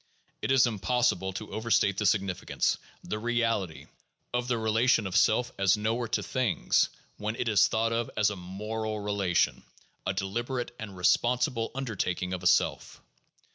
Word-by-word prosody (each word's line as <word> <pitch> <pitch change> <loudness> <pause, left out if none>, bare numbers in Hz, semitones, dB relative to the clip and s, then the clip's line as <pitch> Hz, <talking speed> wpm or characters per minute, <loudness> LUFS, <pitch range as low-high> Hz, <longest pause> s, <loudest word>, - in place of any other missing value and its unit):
It - - -1
is 135 -2 +6
impossible 105 -3 0
to 105 +3 -7
overstate 110 -3 +1
the 105 - +2
significance, 95 -2 0 0.2
the 105 - -4
reality, 115 -7 -1 0.5
of 125 0 -1
the 125 -2 +1
relation 115 +1 +2
of 95 - -4
self 125 +3 +3
as 100 +1 +4
knower 115 +3 -1
to - - -1
things 130 -6 +1 0.3
when 105 +1 -3
it 120 - -2
is 105 -4 +5
thought 115 +1 0
of 115 0 -1
as 105 -1 +3
a - - -4
moral 105 +4 -4
relation, 100 -4 +1 0.5
a - - +1
deliberate 120 +6 -3
and 100 -4 -7
responsible 120 - +2
undertaking 95 -8 -2
of 90 - -4
a 90 - +1
self. - - +1
110 Hz, 155 wpm, -28 LUFS, 95-120 Hz, 0.5 s, is